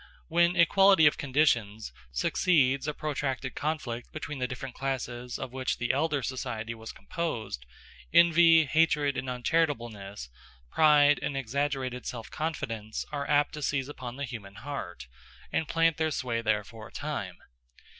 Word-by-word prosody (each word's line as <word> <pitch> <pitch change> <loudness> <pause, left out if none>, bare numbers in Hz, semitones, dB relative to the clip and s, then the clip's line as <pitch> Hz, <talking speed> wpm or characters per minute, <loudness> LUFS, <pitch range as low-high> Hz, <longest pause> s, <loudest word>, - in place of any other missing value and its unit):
When 170 +2 +3
equality 190 0 +6
of 150 - +4
conditions 115 - +1 0.2
succeeds 140 - +2
a 150 - -1
protracted 135 -3 -3
conflict 140 -6 -3
between 150 -2 -6
the 125 - 0
different 125 0 -6
classes 125 -2 -4
of 130 -2 -6
which 130 -1 -1
the 125 - 0
elder 145 -1 0
society 115 -2 -4
was 110 0 -9
composed, 110 - -4 0.4
envy, 165 -1 +6
hatred, 150 -2 +2
and 130 - -3
uncharitableness, 120 - -1 0.4
pride, 145 -2 +5
and 140 - -2
exaggerated 135 -1 -2
self 115 -2 -6
confidence 115 -9 -4
are 140 -1 -3
apt 145 0 +3
to 150 - -6
seize 140 -1 -1
upon 125 -4 -7
the 140 +1 -3
human 105 -6 -9
heart, 105 - -6 0.5
and 160 - 0
plant 165 0 +2
their 160 -1 +1
sway 120 -5 -2
there 105 -2 +1
for 110 +2 -11
a - - -18
time. 115 -12 -4
135 Hz, 145 wpm, -29 LUFS, 120-150 Hz, 0.5 s, equality